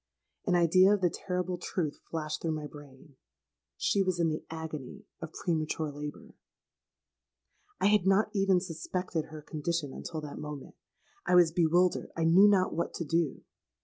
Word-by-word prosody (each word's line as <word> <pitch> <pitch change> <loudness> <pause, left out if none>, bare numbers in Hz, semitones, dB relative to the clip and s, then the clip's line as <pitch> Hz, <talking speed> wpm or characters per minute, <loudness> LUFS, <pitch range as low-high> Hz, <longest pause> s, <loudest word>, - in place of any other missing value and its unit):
An 180 - +3
idea 185 +4 +5
of 200 - -5
the 175 -2 +2
terrible 180 0 -3
truth 165 -4 -3
flashed 155 -2 -3
through 165 -1 -1
my 155 -1 -4
brain: 140 -1 -13 0.6
she 200 - +1
was 185 -2 0
in 165 -1 +3
the 155 - -3
agony 160 -5 -7 0.2
of 160 -1 -6
premature 155 -2 -2
labour! 145 +1 -8 1.5
"I - - +1
had 205 -2 +4
not 200 +3 +3
even 195 -2 +3
suspected 180 -1 -3
her 155 -1 -10
condition 155 -2 -3
until 160 -2 -6
that 150 -1 -7
moment. 150 -2 -7 0.5
I 180 - +4
was 175 -2 +6
bewildered—I 170 0 +1
knew 175 +5 +7
not 195 -3 +3
what 170 +1 -2
to 170 - -3
do. 165 -2 0
165 Hz, 155 wpm, -30 LUFS, 155-180 Hz, 1.5 s, knew